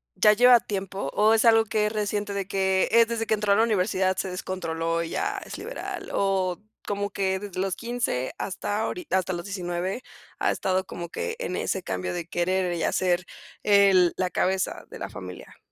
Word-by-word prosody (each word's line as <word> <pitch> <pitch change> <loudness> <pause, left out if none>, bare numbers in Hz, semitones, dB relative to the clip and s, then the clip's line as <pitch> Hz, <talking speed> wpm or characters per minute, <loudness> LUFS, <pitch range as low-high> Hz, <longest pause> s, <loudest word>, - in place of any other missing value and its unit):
ya 210 - +6
lleva 245 +2 +7
tiempo 195 -8 -4
o 215 +2 +4
es 225 +2 +3
algo 225 -1 +6
que 215 -1 0
es 210 - -1
reciente, 205 -1 -2
de 195 -1 -3
que 190 -1 +1
es 230 +1 +6
desde 230 -1 -2
que 220 - +1
entró 210 -1 +2
a - - +4
la 220 - +4
universidad 190 -3 +1
se 190 - -2
descontroló 165 -2 -2
y 165 - -6
ya - - -1
es - - -7
liberal? - - -6
O 190 -2 0 0.2
como 205 0 -2
que 190 -1 0
desde 195 -3 -6
los 195 -1 -1
15 235 - -2
hasta 205 +2 -3
ahori 355 +8 -4
hasta 185 0 +1
los 175 0 -5
19 185 +3 -3 0.4
ha - - +2
estado 190 0 0
como 170 -2 -7
que 465 - -3
en - - -3
ese 190 - -2
cambio 90 - -3
de 170 -1 -4
querer 180 +1 0
y 170 - -2
hacer 180 -1 +1 0.4
el 195 -4 +5
la 185 -1 0
cabeza 190 +1 -1
de - - -10
la - - -5
familia. 90 -1 -10
190 Hz, 200 wpm, -26 LUFS, 180-210 Hz, 0.4 s, lleva